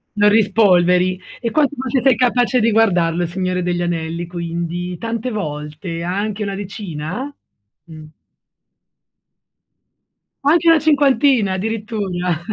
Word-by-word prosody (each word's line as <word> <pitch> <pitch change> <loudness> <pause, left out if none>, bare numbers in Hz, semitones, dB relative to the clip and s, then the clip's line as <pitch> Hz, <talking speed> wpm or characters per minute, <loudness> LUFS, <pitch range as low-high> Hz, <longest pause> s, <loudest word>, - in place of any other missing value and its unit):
Lo 205 0 +4
rispolveri. 185 -4 +3 0.2
E 230 -2 -3
quanto 295 -2 +2
invece 260 0 -1
sei 265 0 +4
capace 250 0 +2
di 230 0 +2
guardarlo 175 -6 +2
Il 170 - -3
Signore 180 0 -2
degli 175 0 -1
Anelli, 170 0 -3
quindi, 175 +1 -4
tante 230 +3 -4
volte? 155 -2 -5
Anche 200 +4 -2
una 200 -1 -3
decina? 200 - -6 0.5
Mh. 155 -2 -12 2.4
Anche 330 +3 +4
una 330 -1 +6
cinquantina, 275 -8 +3
addirittura? 195 -5 -3
195 Hz, 115 wpm, -19 LUFS, 175-230 Hz, 2.4 s, una